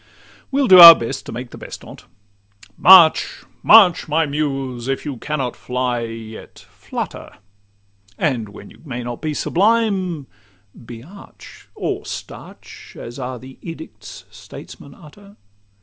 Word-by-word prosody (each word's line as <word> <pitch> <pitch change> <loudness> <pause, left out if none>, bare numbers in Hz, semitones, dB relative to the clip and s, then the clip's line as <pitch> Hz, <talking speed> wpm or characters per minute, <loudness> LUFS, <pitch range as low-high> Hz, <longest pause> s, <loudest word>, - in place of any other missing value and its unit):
We'll 275 -1 0
do 185 -3 +7
our 170 -1 +12
best 130 +4 -7
to - - -7
make 120 +1 -8
the - - -12
best - - -11
on - - -13
't:—March! 105 - +1 0.2
March, 195 -8 +5
my 160 +1 0
Muse! 135 -4 -4
If 135 +2 -4
you 140 -4 -6
cannot 135 -1 -5
fly, 125 -1 -3
yet 115 -1 -11
flutter; - - -8 0.8
And 120 -8 -2
when 100 0 -14
you - - -20
may 125 -5 -7
not 120 0 -8
be 155 -2 -4
sublime, 190 -6 -1 0.6
be 115 -1 -11
arch, 195 +7 -16
Or - - -4
starch, - - -11
as 120 +3 -10
are 125 0 -6
the 130 +2 -15
edicts 165 -2 -11
statesmen 140 -1 -14
utter. 200 +6 -18
135 Hz, 135 wpm, -18 LUFS, 120-170 Hz, 0.8 s, our